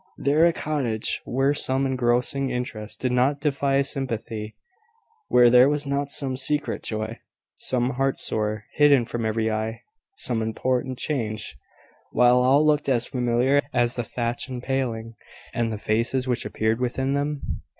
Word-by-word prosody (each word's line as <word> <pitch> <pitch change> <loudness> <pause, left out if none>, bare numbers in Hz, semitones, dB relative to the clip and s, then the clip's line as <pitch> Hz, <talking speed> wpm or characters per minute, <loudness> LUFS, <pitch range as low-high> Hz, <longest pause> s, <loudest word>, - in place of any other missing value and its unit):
there 155 +4 +3
a - - +3
cottage 135 -9 -1
where 135 +3 +1
some 135 -1 +1
engrossing 130 +2 0
interest 125 -4 -5
did 125 - 0
not 130 +3 +2
defy 140 -2 +1
sympathy; 115 -6 -3 0.7
where 125 -1 +6
there 125 +3 +6
was 145 0 -1
not 140 0 -1
some 135 -2 +1
secret 145 +3 -1
joy, 110 +1 -4 0.4
some 125 0 0
heart 135 0 0
sore, 105 0 -2
hidden 145 -4 +5
from 115 -1 -3
every 110 0 0
eye; 110 +1 -3 0.4
some 115 -3 -1
important 125 +3 -1
change, 110 -8 -3 0.6
while 125 0 +5
all 135 +4 +4
looked 150 -1 +2
as 120 -2 +2
familiar 125 +3 +1
as 120 -1 +1
the 120 - -2
thatch 120 +2 -3
and 125 -2 -6
paling, 120 -4 -2 0.4
and 115 -1 -1
the 110 - -3
faces 115 +5 0
which 125 -1 -1
appeared 110 +2 -1
within 130 +2 -1
them? 145 0 -3
125 Hz, 150 wpm, -24 LUFS, 115-135 Hz, 0.7 s, where